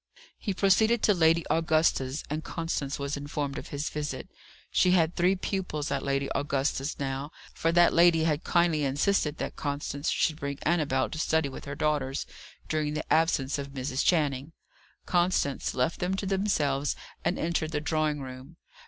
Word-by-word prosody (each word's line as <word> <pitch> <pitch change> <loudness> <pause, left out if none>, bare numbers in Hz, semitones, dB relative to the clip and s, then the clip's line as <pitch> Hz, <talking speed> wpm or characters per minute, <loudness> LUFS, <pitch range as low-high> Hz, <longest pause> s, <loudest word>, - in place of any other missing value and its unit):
He 205 - -2
proceeded 220 +4 +3
to 210 - +5
Lady 165 -2 +3
Augusta's, 155 -4 +1
and 155 +2 -3
Constance 165 -4 -3
was 140 +1 -3
informed 145 -1 -3
of - - -9
his 145 +1 -3
visit. 150 -1 -4 0.4
She 180 - +4
had 165 -2 +3
three 180 +2 +3
pupils 180 -6 -3
at - - 0
Lady 140 0 0
Augusta's 140 0 -1
now, 135 +1 -3 0.2
for 165 - 0
that 175 0 +5
lady 170 -1 +5
had 155 -1 0
kindly 170 -4 +2
insisted 150 +3 +1
that - - -4
Constance 145 0 -3
should 155 - +1
bring 140 -2 -4
Annabel 150 -5 +1
to 155 - -5
study 160 -2 +1
with 130 - -9
her 140 - -5
daughters, 145 -3 -1 0.4
during 155 -1 -1
the 155 - -1
absence 150 -4 +2
of 140 -1 -6
Mrs. 130 0 -2
Channing. 150 -3 +1 0.5
Constance 175 -6 +1
left 130 +6 0
them 180 +2 0
to 195 - -3
themselves 155 -8 0 0.3
and 180 - 0
entered 165 -1 -1
the 150 - 0
drawing 155 -1 0
room. 130 +5 -9
150 Hz, 165 wpm, -28 LUFS, 140-170 Hz, 0.5 s, to